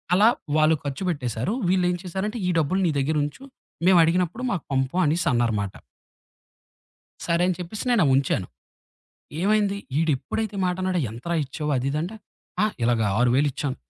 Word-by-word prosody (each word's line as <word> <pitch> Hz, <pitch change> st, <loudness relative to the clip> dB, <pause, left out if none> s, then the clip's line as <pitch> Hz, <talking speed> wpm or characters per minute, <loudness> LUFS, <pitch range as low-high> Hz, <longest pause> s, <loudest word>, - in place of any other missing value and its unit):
అలా 210 Hz, +4 st, +6 dB, 0.3 s
వాళ్ళు 155 Hz, +1 st, +4 dB
ఖర్చుపెట్టేశారు. 140 Hz, -, -2 dB, 0.2 s
వీళ్ళేం 180 Hz, -1 st, +2 dB
చేశారంటే 190 Hz, +6 st, -3 dB
ఈ -, -, +2 dB
డబ్బులు 160 Hz, +5 st, +1 dB
నీ -, -, +2 dB
దగ్గర 145 Hz, +3 st, 0 dB
ఉంచు 145 Hz, -, -6 dB, 0.4 s
మేమడిగినప్పుడు 180 Hz, +4 st, +3 dB
మాకు 180 Hz, -8 st, -2 dB
పంపు 135 Hz, +3 st, 0 dB
అనేసన్నారమాట. 120 Hz, -, +1 dB, 1.5 s
సరే 170 Hz, 0 st, +2 dB
అని 185 Hz, -, +1 dB
చెప్పేసి 180 Hz, +7 st, -6 dB
నేనవుంచాను. 135 Hz, -, +2 dB, 0.9 s
ఏమైంది? 200 Hz, +1 st, +2 dB, 0.2 s
ఈడెప్పుడైతే 165 Hz, -, -1 dB
మాటన్నడొ 185 Hz, 0 st, 0 dB
"ఎంతరా 125 Hz, +10 st, -3 dB
ఇచ్చావు" 150 Hz, +2 st, -3 dB
అది 130 Hz, +2 st, -1 dB
ఇదంటే, 170 Hz, +9 st, -3 dB, 0.5 s
ఆ! -, -, +5 dB, 0.2 s
ఇలాగ 120 Hz, -1 st, +2 dB, 0.2 s
6000 125 Hz, +4 st, +3 dB
ఇచ్చాం. 135 Hz, 0 st, -3 dB
165 Hz, 125 wpm, -24 LUFS, 135-185 Hz, 1.5 s, అలా